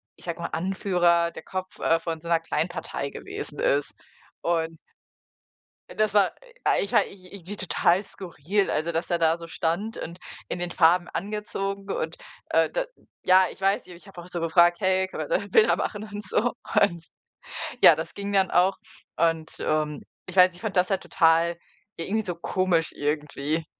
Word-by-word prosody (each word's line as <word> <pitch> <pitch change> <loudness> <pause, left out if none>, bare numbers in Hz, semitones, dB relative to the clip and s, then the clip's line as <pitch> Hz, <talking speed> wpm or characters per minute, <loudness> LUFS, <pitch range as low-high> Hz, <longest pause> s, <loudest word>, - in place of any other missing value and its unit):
ich - - -16
sage 170 -1 -4
mal - - -3
Anführer 175 -2 +2
der - - -9
Kopf, 185 -1 -6
äh, 165 0 +3
von 165 -1 -4
so 170 - -8
'ner 165 -1 +4
Kleinpartei 165 -3 -3
gewesen - - -7
ist. 140 +1 +1 0.5
Und 165 -1 -1 1.2
das 215 -1 +1
war 200 -2 +5 0.5
ich 200 - -3
ja, - - +6
ich 185 -1 -12
irgendwie 200 +1 -7
total 190 0 +2
skurril, 190 +1 -2
also, 165 +2 -1
dass 165 +1 -2
der 175 - +1
da 165 0 +3
so 170 0 -9
stand 185 +9 -2
und 170 +2 -7 0.3
in - - -3
den 175 0 -3
Farben 175 +1 +4
angezogen. 200 0 -4
Und, 160 -2 -2 0.3
äh, 165 -1 +3
da - - -1 0.4
ja, 185 0 +6
ich - - -13
weiß 195 +1 +1
nicht, 180 -2 -11
ich 180 - -17
habe 185 -3 -10
auch 175 - -12
so 175 -2 -4
gefragt: 170 +2 +4
„Hey, 190 -1 +2
kann - - -7
man - - -4
da - - +3
Bilder 445 -1 +5
machen 210 -1 -3
und 205 -1 -6
so?“ 230 +6 +2 0.3
Und, 170 -5 +1 0.8
ja, - - +9
das - - -5
ging 200 0 -4
dann 190 -1 +3
auch 185 +2 +3 0.4
und, 165 -1 +1
ähm 155 -1 -1 0.2
ich 185 - -9
weiß, 180 -1 +6
ich 180 - -12
fand 210 -4 -4
das 180 0 +4
halt 195 -2 0
total 165 +1 +3 0.4
irgendwie 210 +6 -1
so 180 -3 -4
komisch 170 -1 0
irgendwie. 150 +1 -2
175 Hz, 180 wpm, -26 LUFS, 165-195 Hz, 1.2 s, ja